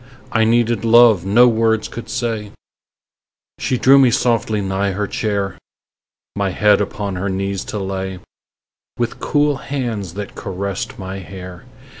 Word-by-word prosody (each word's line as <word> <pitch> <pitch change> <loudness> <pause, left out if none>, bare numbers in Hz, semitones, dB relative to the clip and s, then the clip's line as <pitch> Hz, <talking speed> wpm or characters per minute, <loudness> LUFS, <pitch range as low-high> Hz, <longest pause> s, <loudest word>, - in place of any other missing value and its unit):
I 110 -1 +3
needed 115 0 +2
love 115 -5 +5
no 120 +5 +6
words 110 -1 +1
could 120 - -9
say; 110 -4 -3 1.1
She 130 - 0
drew 135 +3 +6
me 130 -2 +6
softly 115 -2 +1
nigh 95 0 -1
her 105 +2 -1
chair, 100 -1 -2 0.8
My 100 -1 0
head 105 +2 +3
upon 100 -1 -3
her 95 +2 -2
knees 95 0 -2
to - - -5
lay, 95 -1 -4 0.8
With 120 -1 -2
cool 145 -1 +1
hands 115 - -4
that 100 -1 -6
caressed 100 0 -5
my 95 0 -6
hair. 90 0 -10
105 Hz, 140 wpm, -19 LUFS, 95-115 Hz, 1.1 s, no